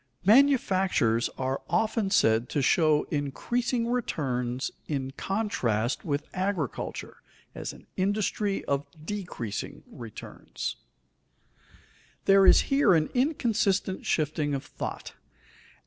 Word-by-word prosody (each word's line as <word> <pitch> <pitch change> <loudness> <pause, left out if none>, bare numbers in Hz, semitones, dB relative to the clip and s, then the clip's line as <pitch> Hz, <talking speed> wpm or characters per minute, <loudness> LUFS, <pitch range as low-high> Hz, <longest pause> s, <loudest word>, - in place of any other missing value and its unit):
_Manufactures 195 - +4
are 130 +1 -2
often 215 +4 +1
said 110 -8 +3
to 145 - 0
show 155 0 +3
increasing 235 - -1
returns 130 - -2 0.2
in 135 -3 -2
contrast 130 - -1
with 145 -3 -2
agriculture 185 - -3 0.4
as - - -5
an - - -15
industry 200 +1 0
of 140 0 -1 0.2
decreasing 160 - -5
returns._ 115 -3 -7 1.5
There 195 0 +6
is - - +7
here 275 -9 +3
an 155 -1 +1
inconsistent 225 - 0
shifting 150 -2 0
of 135 - -5
thought. - - -6
175 Hz, 100 wpm, -27 LUFS, 135-210 Hz, 1.5 s, is